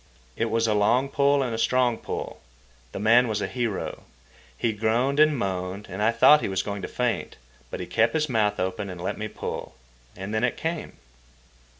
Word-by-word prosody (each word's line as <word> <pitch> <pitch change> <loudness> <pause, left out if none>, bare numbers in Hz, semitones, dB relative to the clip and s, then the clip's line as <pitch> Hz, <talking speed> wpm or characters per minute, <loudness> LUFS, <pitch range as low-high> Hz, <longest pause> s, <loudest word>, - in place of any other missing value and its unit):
It 115 - 0
was 115 +1 +1
a 110 - +2
long 120 +6 +2
pull 140 0 +3
and 120 -3 -3
a 115 - -3
strong 120 0 +2
pull. - - -6 0.5
The - - -6
man 115 +4 +5
was 110 -2 -1
a - - -1
hero. 120 -5 -3 0.6
He 115 -2 0
groaned 115 +7 +1
and 155 -1 +5
moaned, 95 -1 -3
and 95 +3 -4
I 110 +2 +4
thought 150 +6 +6
he - - -2
was 95 -1 -1
going 100 -1 -4
to - - -4
faint. 125 -2 -2 0.3
But - - -5
he - - -4
kept 115 +4 +1
his 155 -1 +1
mouth 105 -5 +1
open 95 +2 -2
and 90 -1 -7
let 90 - -3
me 110 - -3
pull. - - -6 0.4
And 95 +3 -6
then 110 +2 0
it 125 - 0
came. 165 0 -4
115 Hz, 205 wpm, -25 LUFS, 105-125 Hz, 0.6 s, thought